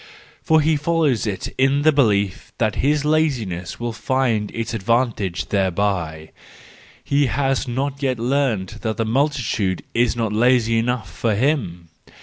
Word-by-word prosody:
For 160 -1 +3
he 155 0 +2
follows 150 -7 +1
it 100 -2 -3
in 135 +2 +3
the 155 - +6
belief 100 -9 +1
that 110 -2 0
his 145 +2 +1
laziness 120 - -1
will 120 -1 -3
find 120 -3 0
its 115 0 -4
advantage 105 -6 -1
thereby: 95 -5 -1 0.7
he 140 0 +2
has 135 +3 0
not 135 +3 -3
yet 130 -3 0
learned 115 -5 -1
that 110 -1 -2
the 115 - 0
multitude 115 -7 0
is 120 0 +2
not 115 -3 -1
lazy 115 0 +3
enough 120 -1 -1
for 110 -3 0
him 100 - -1
120 Hz, 140 wpm, -21 LUFS, 105-140 Hz, 0.7 s, the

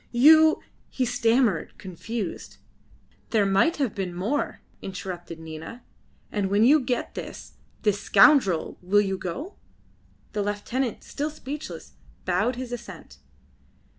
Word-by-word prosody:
You 315 +6 +6
" - - -36
he 255 - -1
stammered, 230 -5 +1
confused. 195 +2 -6 0.7
"There 215 -3 +3
might 195 - +3
have 270 -8 0
been 185 -3 -4
more," 220 +11 -2 0.2
interrupted 180 -3 -7
Nina. 160 +9 -9 0.5
"And 200 -3 -1
when 205 +2 +3
you 290 +6 +6
get 250 -2 -2
this - - -8 0.3
this 205 -2 +1
scoundrel 215 - +4
will 200 +3 +3
you 195 -2 -2
go?" 280 - -6 0.8
The 210 - -1
lieutenant, 210 +4 -2
still 295 +2 -3
speechless, 300 0 -8 0.3
bowed 245 - +1
his 250 0 -6
assent. 215 -8 -9
220 Hz, 125 wpm, -25 LUFS, 190-260 Hz, 0.8 s, You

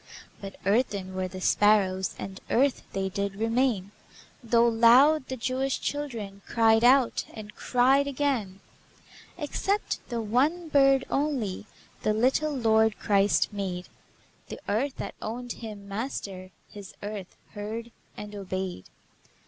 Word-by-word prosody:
But 195 -1 -7
earthen 200 -3 0
were 185 0 -2
the 185 +1 -8
sparrows, 190 -2 +3
And 190 0 -7
earth 270 +2 +2
they 195 0 -2
did 200 +1 -3
remain, 225 -2 0 0.5
Though 235 0 +4
loud 250 +6 +5
the 260 - -4
Jewish 260 +3 -1
children 230 -9 -4
Cried 225 -1 +4
out, 255 0 +4
and 215 -1 -9
cried 265 +3 +3
again. 250 -9 -1 0.8
Except 390 +6 -1
the 235 -2 -2
one 280 +10 +1
bird 275 -2 +4
only 255 -9 -1 0.3
The 215 - +1
little 265 +7 +2
Lord 220 -2 +3
Christ 200 +1 +2
made; 185 -3 -4 0.6
The - - -8
earth 255 +7 0
that - - -5
owned 240 +3 -5
Him 210 -4 -8
Master, 200 -4 -5 0.2
His 200 -2 -11
earth 205 -3 -6
heard 220 +3 -6 0.3
and 210 0 -8
obeyed. 190 - -5
225 Hz, 125 wpm, -27 LUFS, 200-260 Hz, 0.8 s, loud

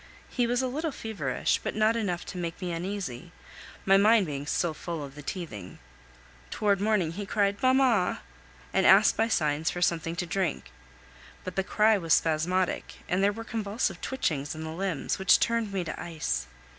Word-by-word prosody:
He 245 -2 +1
was 245 +2 +1
a - - +1
little 305 +5 -2
feverish, 200 - -1
but - - -3
not 215 +1 +3
enough 190 -6 -2
to 185 - -7
make 170 -1 -4
me 180 -2 -3
uneasy, 175 -4 -5 0.5
my 195 0 +6
mind 215 +1 +5
being 145 -2 -5
still 165 +1 0
full 165 0 -5
of 140 -1 -9
the 150 - -10
teething. 135 - -6 0.7
Towards 200 -2 +1
morning 205 -6 +1
he 200 +4 -6
cried 200 -1 0
"Mamma!" 255 -7 +3 0.5
and 190 - +3
asked 200 +3 +6
by 225 +1 +2
signs 155 -6 +1
for 175 - -4
something 165 -1 0
to 180 - -2
drink; 180 -1 -2 0.7
but 185 - -6
the 195 - +1
cry 210 +2 +3
was 165 -3 +3
spasmodic, 175 +4 0
and 185 +2 +1
there 200 - +4
were 225 +2 -7
convulsive 220 -1 -2
twitchings 155 - -2
in 160 - -6
the 160 - -5
limbs, 180 -3 -2
which 190 0 +5
turned 230 -3 0
me 190 -2 -1
to 155 - -6
ice. 110 - -3
185 Hz, 180 wpm, -28 LUFS, 165-215 Hz, 0.7 s, my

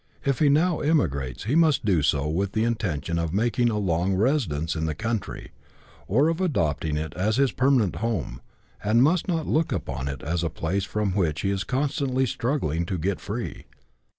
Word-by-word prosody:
If 140 -2 +1
he 150 - +4
now 160 +4 +3
emigrates, 70 - 0
he 115 - -1
must 155 -6 +3
do 90 -7 +3
so 70 0 +1
with 95 +5 -1
the 110 - +1
intention 85 -8 -1
of 85 +1 -2
making 120 +3 +2
a 110 - -1
long 95 -1 +1
residence 95 - 0
in 80 0 -1
the 80 - -2
country, 110 +3 -4 0.6
or 135 +10 +3
of 165 +2 0
adopting 80 - 0
it 75 0 -4
as 105 +4 0
his 135 -1 +3
permanent 125 - +2
home, 95 - -3 0.4
and 115 +4 +4
must 160 +4 +2
not 165 -4 0
look 160 +1 +1
upon 65 - -3
it 70 -3 -5
as 85 +3 -1
a 85 - 0
place 95 +6 -2
from 105 0 -1
which 85 -5 0
he 100 - 0
is 95 -1 -1
constantly 130 - 0
struggling 115 - -1
to 95 - -2
get 90 +4 -2
free. 115 +4 -5
100 Hz, 190 wpm, -25 LUFS, 80-130 Hz, 0.6 s, he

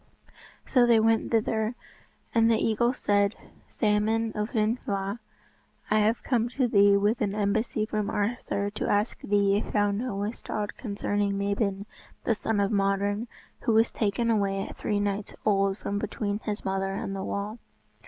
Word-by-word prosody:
So 245 -2 +4
they 230 -2 +6
went 225 0 +2
thither, 220 0 0 0.6
and 230 -1 +4
the 225 - +4
eagle 230 +2 +2
said, 205 -4 +1 0.3
"Salmon 220 +1 +1
of 210 +1 -2
Llyn 220 +3 +1
Llyw, 200 +2 -2 0.7
I 215 - +4
have 220 +2 +1
come 240 -2 +1
to 260 -3 +3
thee 200 -2 +5
with 205 +4 +1
an 205 -1 0
embassy 215 +1 0
from 215 -1 -2
Arthur 205 -1 -1
to 210 - -3
ask 205 +2 +1
thee 200 -1 +2
if 210 - -4
thou 205 -1 +3
knowest 205 0 -4
aught 210 -1 -2
concerning 205 -2 -1
Mabon, 200 0 -1 0.4
the 230 - +2
son 220 0 -1
of 200 +1 +1
Modron, 200 +2 +1 0.3
who 235 - 0
was 225 +1 +4
taken 230 +2 0
away 195 -2 0
at - - -9
three 205 -1 -1
nights 205 0 -2
old 195 -2 +2
from 205 -1 -3
between 205 -1 -2
his 210 -1 -3
mother 195 0 -1
and 195 0 -4
the 195 - -4
wall." 205 +4 -4
210 Hz, 165 wpm, -27 LUFS, 200-225 Hz, 0.7 s, they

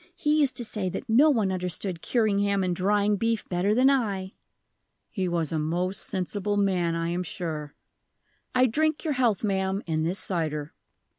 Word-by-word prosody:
He 300 -1 +1
used 280 -3 +3
to 240 - 0
say 210 -4 -2
that 190 +8 -6
no 255 +8 +5
one 220 -9 +2
understood 180 -1 -3
curing 215 -5 +1
ham 200 -1 +1
and 180 -1 0
drying 205 +2 +2
beef 230 +1 -1
better 190 +4 +1
than 255 +2 +4
I." 205 -8 0 0.8
"He 190 -4 -2
was 170 -3 -1
a 160 - 0
most 175 +5 -1
sensible 205 +2 -1
man, 180 -4 +1
I 165 0 -1
am 175 +1 -1
sure. 155 -4 -5 0.8
I 255 0 +5
drink 310 +5 +1
your 310 -3 0
health, 240 -7 +1
ma'am, 195 -1 -1
in 155 -2 -1
this 170 +4 +1
cider." 155 -5 -2
195 Hz, 175 wpm, -26 LUFS, 175-225 Hz, 0.8 s, no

